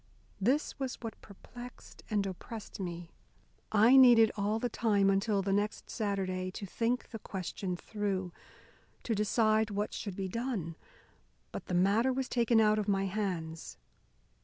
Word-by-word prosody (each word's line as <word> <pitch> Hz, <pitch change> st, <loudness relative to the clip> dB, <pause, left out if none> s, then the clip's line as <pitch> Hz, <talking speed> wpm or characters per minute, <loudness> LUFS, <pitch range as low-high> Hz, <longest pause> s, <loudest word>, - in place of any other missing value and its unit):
This 265 Hz, +9 st, 0 dB
was 265 Hz, -2 st, -2 dB
what 225 Hz, -2 st, -7 dB
perplexed 240 Hz, +4 st, -12 dB
and 205 Hz, -3 st, +1 dB
oppressed 200 Hz, +4 st, -7 dB
me. 175 Hz, -2 st, -5 dB, 0.6 s
I 220 Hz, +5 st, +6 dB
needed 240 Hz, -4 st, +8 dB
all 210 Hz, +1 st, 0 dB
the 245 Hz, -, -1 dB
time 205 Hz, -4 st, +2 dB
until 195 Hz, 0 st, +1 dB
the 195 Hz, 0 st, 0 dB
next 205 Hz, +1 st, -1 dB
Saturday 190 Hz, -4 st, -2 dB
to 200 Hz, -, -6 dB
think 235 Hz, +5 st, -1 dB
the 225 Hz, -, -7 dB
question 185 Hz, -1 st, -4 dB
through, 195 Hz, -3 st, -3 dB, 0.7 s
to 230 Hz, -, -1 dB
decide 215 Hz, +1 st, +2 dB
what 205 Hz, +1 st, -2 dB
should 200 Hz, -4 st, -5 dB
be 195 Hz, 0 st, -3 dB
done. 205 Hz, -6 st, -3 dB, 0.8 s
But -, -, -7 dB
the 180 Hz, -, -1 dB
matter 205 Hz, +8 st, +3 dB
was 260 Hz, 0 st, -2 dB
taken 235 Hz, -2 st, +3 dB
out 215 Hz, -1 st, +4 dB
of 210 Hz, -, -2 dB
my 195 Hz, -1 st, +1 dB
hands. 180 Hz, -5 st, -4 dB
210 Hz, 150 wpm, -31 LUFS, 195-230 Hz, 0.8 s, needed